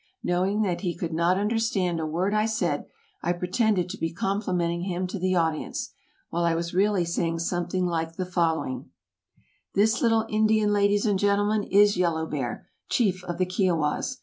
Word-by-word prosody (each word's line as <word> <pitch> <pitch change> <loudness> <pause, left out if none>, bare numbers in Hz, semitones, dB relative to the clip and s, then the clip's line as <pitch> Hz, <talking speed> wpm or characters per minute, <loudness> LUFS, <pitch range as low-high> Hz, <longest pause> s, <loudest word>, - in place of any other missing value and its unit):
Knowing 190 +4 +1
that 180 -4 -1
he 175 -4 -2
could 170 -2 -3
not 170 +3 +2
understand 205 -5 0
a 160 - -2
word 180 +6 -1
I 215 +1 +2
said, 180 -10 -1 0.3
I 175 - 0
pretended 180 +1 +1
to 200 - -6
be 165 - -1
complimenting 180 -2 -1
him 185 -1 -2
to 185 +2 -5
the 185 +1 +1
audience, 160 -3 -1 0.4
while 170 +1 0
I 170 -1 +2
was 170 +1 -3
really 195 -1 +2
saying 165 0 -1
something 175 +2 -1
like 165 -1 -2
the 185 - -3
following: 165 -7 -1 0.9
"This 220 +5 +3
little 225 -3 +3
Indian, 215 -1 +2
ladies 205 +1 +2
and 205 -3 +2
gentlemen, 205 +1 +2
is 205 0 +4
Yellow 165 -3 +1
Bear, 135 -6 -4 0.2
chief 185 -6 +1
of 175 -1 -4
the 185 - +2
Kiowas. 180 +5 0
185 Hz, 175 wpm, -26 LUFS, 170-205 Hz, 0.9 s, is